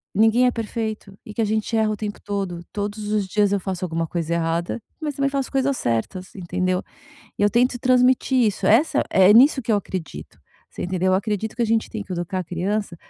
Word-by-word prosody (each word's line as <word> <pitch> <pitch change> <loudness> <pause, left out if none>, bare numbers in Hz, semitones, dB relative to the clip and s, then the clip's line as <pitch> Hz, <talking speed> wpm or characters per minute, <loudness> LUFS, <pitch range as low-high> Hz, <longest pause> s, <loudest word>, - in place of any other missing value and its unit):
ninguém 225 +4 +4
é - - +3
perfeito 220 -3 -5
e 210 - -9
que 225 - -1
a - - +2
gente 215 +2 -1
erra 220 -1 +2
o - - -1
tempo 205 0 -5
todo, 195 -4 -4
todos 205 +1 -4
os 210 -2 0
dias 205 +1 +2
eu 200 - +1
faço 185 -1 -3
alguma 165 -1 -2
coisa 170 0 -2
errada, 170 +5 -1 0.2
mas 300 -2 -3
também 275 0 +1
faço 275 -1 -2
coisas 270 0 +1
certas, 120 - -2
entendeu? 185 0 -1 0.6
E - - -3
eu 205 - +4
tento 245 +3 +2
transmitir 255 +1 +3
isso, 195 -2 -1
essa 245 +11 +4
é 190 +1 +6
nisso 265 +4 +6
que 230 - -2
eu 210 - +4
acredito, 185 -4 -7 0.3
você - - -7
entendeu. 185 +1 -1
Eu - - +5
acredito 210 +2 -2
que 240 - -2
a - - +2
gente 225 0 0
tem 215 -2 -5
que 190 - -11
educar 175 +2 -3
a - - -2
criança 185 +3 -2
205 Hz, 220 wpm, -22 LUFS, 185-230 Hz, 0.6 s, é